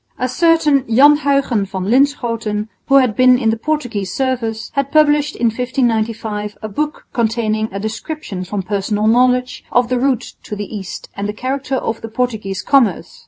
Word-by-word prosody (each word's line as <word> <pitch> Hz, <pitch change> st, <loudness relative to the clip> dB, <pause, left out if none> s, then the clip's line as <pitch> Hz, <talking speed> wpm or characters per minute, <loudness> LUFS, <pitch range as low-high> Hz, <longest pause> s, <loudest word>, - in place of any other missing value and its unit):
A 255 Hz, -, -1 dB
certain 305 Hz, -1 st, +3 dB
Jan 280 Hz, +6 st, +6 dB
Huyghen 275 Hz, -7 st, +1 dB
van 190 Hz, -1 st, -4 dB
Linschoten, 230 Hz, -4 st, 0 dB, 0.2 s
who 275 Hz, -, +4 dB
had 255 Hz, -6 st, +4 dB
been 255 Hz, -1 st, +5 dB
in 225 Hz, -3 st, +1 dB
the -, -, 0 dB
Portuguese 230 Hz, -8 st, -2 dB
service, 230 Hz, -4 st, -2 dB
had 275 Hz, 0 st, -1 dB
published 295 Hz, -1 st, +3 dB
in 240 Hz, -, -1 dB
1595 225 Hz, -3 st, -2 dB
a -, -, -2 dB
book 300 Hz, +9 st, -3 dB
containing 220 Hz, -2 st, 0 dB
a 195 Hz, -, -4 dB
description 220 Hz, -, -5 dB
from 195 Hz, +1 st, -4 dB
personal 205 Hz, +2 st, -1 dB
knowledge 250 Hz, +2 st, +2 dB
of 245 Hz, -1 st, +2 dB
the 250 Hz, -1 st, +1 dB
route 260 Hz, -2 st, 0 dB
to 210 Hz, -, -6 dB
the 205 Hz, +1 st, -6 dB
East 190 Hz, -3 st, -7 dB
and 200 Hz, +1 st, -3 dB
the -, -, -2 dB
character 265 Hz, +3 st, -3 dB
of 225 Hz, -3 st, -3 dB
the 225 Hz, -, -7 dB
Portuguese 220 Hz, -5 st, -3 dB
commerce. 275 Hz, -, +1 dB
235 Hz, 170 wpm, -17 LUFS, 215-270 Hz, 0.2 s, Jan